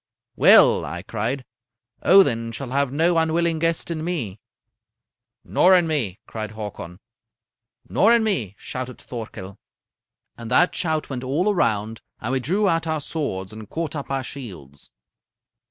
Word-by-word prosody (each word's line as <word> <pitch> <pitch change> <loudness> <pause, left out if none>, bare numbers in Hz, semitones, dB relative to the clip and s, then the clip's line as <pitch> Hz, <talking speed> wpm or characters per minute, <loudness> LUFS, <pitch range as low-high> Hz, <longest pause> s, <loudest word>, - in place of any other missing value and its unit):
"'Well,' - - +6
I 90 +1 -6
cried, 115 +6 -3 0.6
'Odin 115 -12 +4
shall 125 +3 -6
have 140 -1 +1
no 165 +4 +2
unwilling 165 0 +1
guest 165 +1 0
in 155 -2 -3
me.' 130 - -3 1.0
"'Nor 185 +1 +4
in 175 -2 +4
me,' 130 - -1
cried 110 -1 -6
Hakon. 100 -5 -7 0.9
"'Nor 220 - +3
in 230 - +2
me,' 125 - -1
shouted 125 -1 -6
Thorkel. 105 -5 -8 0.8
"And 115 -1 -7
that 175 +8 +4
shout 155 -3 -2
went 130 -1 -4
all 165 +11 +1
around, 110 - 0 0.2
and 115 - -4
we 135 - +1
drew 190 - +1
out 165 -2 +1
our 160 -1 0
swords 110 - -4
and 110 -1 -10
caught 160 -2 -4
up 145 - -5
our 135 -1 -1
shields. 90 - -9
135 Hz, 145 wpm, -23 LUFS, 110-165 Hz, 1.0 s, Well